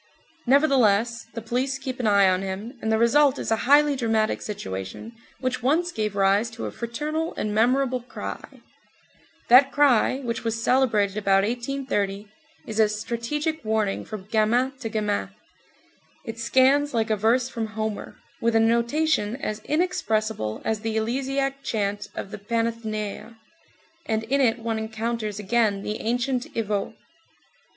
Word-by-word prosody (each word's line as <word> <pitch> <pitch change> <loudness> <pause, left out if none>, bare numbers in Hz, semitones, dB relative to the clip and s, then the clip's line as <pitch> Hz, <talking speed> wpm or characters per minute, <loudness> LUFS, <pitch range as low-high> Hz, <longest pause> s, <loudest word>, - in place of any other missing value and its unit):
Nevertheless 235 -5 +3
the 230 - -5
police 255 +4 -1
keep 265 -2 -6
an 240 - 0
eye 200 -2 +5
on 185 0 +2
him, 195 +6 -5
and 220 - -1
the 220 - +3
result 270 +4 +4
is - - -4
a - - +5
highly 290 0 +6
dramatic 225 -4 0
situation 95 - -6 0.3
which 255 -1 -2
once 325 +8 +1
gave 210 - -2
rise 200 +3 +3
to 225 +1 -7
a - - -4
fraternal 300 +7 -3
and 210 - -2
memorable 255 +3 +2
cry; 245 - -8 0.9
that 265 +3 +7
cry 270 -4 +3
which 230 -3 -3
was 225 0 -2
celebrated 215 -7 +2
about 195 -2 +3
1830, 235 -4 -2 0.4
is 220 0 -4
a 215 -1 +5
strategic 240 +9 -3
warning 215 -2 0
from 210 -3 -8
gamin 225 +5 +2
to 230 -5 -4
gamin; 210 - -1 1.0
it 225 0 -6
scans 265 +4 +3
like 225 -1 +1
a - - +3
verse 230 +5 +2
from 230 -3 -4
Homer, 215 -1 -5 0.2
with 230 0 +1
a - - +6
notation 235 +1 +1
as 215 -5 -4
inexpressible 220 - -1
as 220 -1 0
the 220 0 -2
eleusiac 270 +4 -1
chant 205 -5 -2
of 195 - -6
the - - -7
Panathenæa, 225 0 -3 0.7
and 220 0 0
in 275 +5 +1
it 235 -3 +3
one 225 -1 -2
encounters 220 -1 -3
again 210 -1 +1
the 210 - -4
ancient 245 +4 -1
Evohe. 210 -3 -2
230 Hz, 150 wpm, -25 LUFS, 215-260 Hz, 1.0 s, that